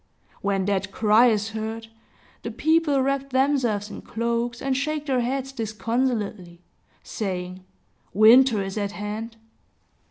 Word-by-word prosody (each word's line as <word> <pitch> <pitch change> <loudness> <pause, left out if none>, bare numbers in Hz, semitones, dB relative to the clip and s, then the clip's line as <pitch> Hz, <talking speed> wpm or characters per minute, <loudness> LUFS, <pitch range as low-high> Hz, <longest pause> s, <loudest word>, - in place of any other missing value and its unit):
When 195 -1 0
that 200 0 -1
cry 220 +4 +4
is 215 -2 +1
heard, 220 +1 -5 0.6
the 230 - -5
people 290 +2 +2
wrap 275 0 -1
themselves 260 -6 +1
in - - -8
cloaks, 235 +1 -2
and 270 -1 -1
shake 300 +2 -2
their 265 -3 +1
heads 265 +2 -2
disconsolately, 220 -6 -3 0.4
saying, 185 -3 -5 0.5
"Winter 220 +1 +6
is 195 +2 -4
at 200 0 -3
hand!" 215 +3 -6
225 Hz, 125 wpm, -24 LUFS, 205-265 Hz, 0.6 s, Winter